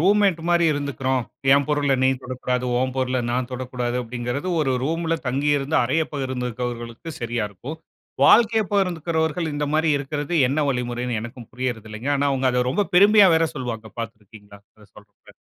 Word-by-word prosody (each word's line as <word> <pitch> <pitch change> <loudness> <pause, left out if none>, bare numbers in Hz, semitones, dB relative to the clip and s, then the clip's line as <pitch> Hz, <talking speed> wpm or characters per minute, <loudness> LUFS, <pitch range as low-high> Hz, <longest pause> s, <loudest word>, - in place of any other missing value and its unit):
Roommate 195 -1 +3
மாரி 170 -1 +3
இருந்துக்குறோம். 135 -3 -1 0.3
என் 140 -1 +2
பொருள 145 -2 +2
நீ - - +5
தொடக்கூடாது, 125 0 -2 0.2
ஒன் 130 0 -1
பொருள 130 -1 0
நான் 125 0 -2
தொடக்கூடாது 125 -1 -3
அப்டிங்கிறது 120 +6 -4
ஒரு 135 -3 +1
ரூம்ல 165 +2 0
தங்கி 140 +4 0
இருந்து 140 +3 -1
அறைய 160 +7 +1
பகிர்ந்திருக்கிறவர்களுக்கு 125 +1 -4
சரியா 120 -2 -2
இருக்கும். 130 - -8 0.5
வாழ்க்கைய 225 -1 +5
பகிர்ந்துகிறவர்கள் 165 -4 0
இந்த 145 0 -1
மாரி 155 +1 +2
இருக்கிறது 145 +3 -4
என்ன 140 +4 -1
வழிமுறைனு 125 -1 -2
எனக்கும் 120 +1 -9
புரிறதில்லங்க. 115 -1 -4
ஆனா, 140 - 0
அவுங்க 135 -1 +1
அத 125 0 +1
ரொம்ப 200 +9 0
பெருமையா 200 +2 +7
வேற 165 0 +3
சொல்லுவாங்க 120 -5 -5
பார்த்திருக்கீங்களா? 105 -2 -9 0.2
இது 105 -2 -18
சொல்லுறப்ப. 105 -1 -18
130 Hz, 150 wpm, -23 LUFS, 120-160 Hz, 0.5 s, பெருமையா